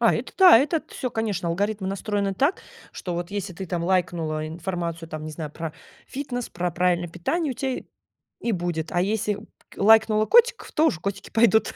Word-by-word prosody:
А, - - +4
это - - -4
да. 365 -10 +9
Это 300 +4 +1
т - - -17
всё, 255 -3 -3
конечно, 210 -7 -2
алгоритмы 200 +3 -1
настроены 200 0 -1
так, 285 - +1 0.3
что 180 - -5
вот 175 +1 -4
если 200 -2 -4
ты 190 +3 -7
там 170 -1 -2
лайкнула 165 -4 0
информацию 170 0 -4
там, 155 -1 -6
не 155 - -5
знаю, 155 -1 -6
про 160 0 -5 0.3
фитнес, 255 -3 -4
про 175 0 -2
правильное 175 0 +1
питание, 270 - -1
у - - -10
тебя 265 +2 -2
и - - -11 0.6
и 235 - -1
будет. 175 -5 -2
А 175 - +1
если 210 +2 0
п 205 - -11 0.3
к - - -15
лайкнула 220 0 +5
котиков, 480 +1 +4
то 315 +1 +3
уже 170 - +1
котики 200 -1 -4
пойдут. 220 -1 +3
195 Hz, 205 wpm, -24 LUFS, 170-225 Hz, 0.6 s, да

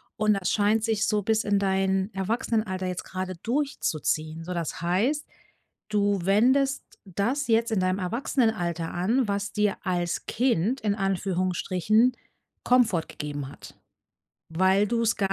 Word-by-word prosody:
Und 215 -1 +2
das 195 -2 -1
scheint 215 +1 +2
sich 220 -2 +1
so 210 -1 +1
bis 220 +2 +1
in 205 -1 +1
dein 190 0 +1
Erwachsenenalter 210 -1 -1
jetzt 180 0 -4
grade 185 0 -5
durchzuziehen. 165 - -1
So, 180 - -4
das 170 -2 -3
heißt, 220 - 0 0.6
du 205 -1 +1
wendest 260 +8 +3 0.2
das 230 +10 -1
jetzt 230 +1 +2
in 190 - +1
deinem 185 +1 0
Erwachsenenalter 185 - -1
an, 220 +8 +1
was 200 0 -2
dir 210 -1 +1
als 175 -2 -1
Kind 240 0 +1
in 205 -2 0
Anführungsstrichen 195 +3 +1 0.5
Komfort 235 -10 +3
gegeben 145 -2 -5
hat. - - -13 0.7
Weil 190 +5 +3
du 235 +1 0
es 230 0 +2
gar 195 -1 0
200 Hz, 140 wpm, -26 LUFS, 185-225 Hz, 0.7 s, wendest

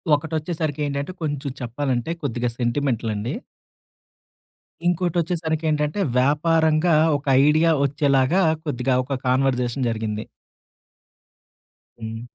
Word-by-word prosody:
ఒకటొచ్చేసరికి 155 -1 -3
ఏంటంటే, 140 +3 -3
కొంచెం 145 -2 -2
చెప్పాలంటే 125 +2 -2
కొద్దిగా 120 -2 -1
సెంటిమెంటలండి. 120 -3 -1 1.5
ఇంకోటొచ్చేసరికేంటంటే, 160 -2 0 0.2
వ్యాపారంగా 160 +3 +3 0.2
ఒక 145 - -14 0.2
ఐడియా 155 +2 +4
వచ్చేలాగా, 140 +4 +2 0.2
కొద్దిగా 125 -2 0
ఒక 135 -1 -3
కాన్వర్సేషన్ 125 -1 +1
జరిగింది. 110 -1 -3 1.7
హ్మ్. 115 0 -6
145 Hz, 80 wpm, -23 LUFS, 125-160 Hz, 1.7 s, ఐడియా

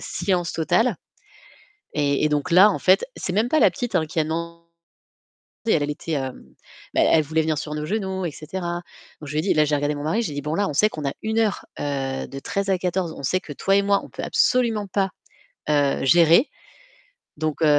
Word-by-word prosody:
silence 180 -3 -1
total, 180 +6 +1 1.0
et 145 0 +1
et - - +3
donc 150 +4 -1
là 190 +5 +7
en - - -2
fait, 190 +2 +4
c'est 180 - -3
même 220 +4 +2
pas 310 - +3
la - - +6
petite 245 -4 -5
hein 160 -2 +1
qui 160 - -6
a - - +2
demandé, 170 +1 -4 1.0
elle 150 -10 +2
était, 160 +2 -5
hem, 130 -3 -3 0.5
bah, - - +3
elle 155 -2 +4
voulait 160 +2 0
venir 155 -1 0
sur 150 0 -5
nos 150 0 -4
genoux 190 -1 -2
et - - -2
cetera. 175 +3 -5 0.4
Donc 150 - -7
je - - -6
lui - - 0
ai - - -3
dit 200 - +1
là, 155 - +4
j'ai 150 0 0
regardé 145 +1 -1
mon 145 - -6
mari, 210 +9 +1
j'ai 150 -10 -4
dit: 145 - -4
«Bon, 150 +2 -2
là 200 +1 +1
on 145 - -4
sait 215 +8 +4
qu'on 150 -2 -5
a 135 - -3
1 220 +1 -1
heure, 215 -3 0 0.2
heu, 135 -2 -2
de 135 - -7
13 200 +5 -3
à 190 - +3
14, 180 -2 -1
on - - -9
sait 185 +7 +1
que 150 - -9
toi 195 +7 +1
et - - +5
moi, 200 0 +2
on - - -13
peut - - -7
absolument 230 -5 +2
pas, 195 0 0 0.6
heu, 145 -2 +2
gérer. 170 - +5 0.9
Donc, 155 0 -3
heu, 160 - +4
170 Hz, 230 wpm, -23 LUFS, 150-195 Hz, 1.0 s, là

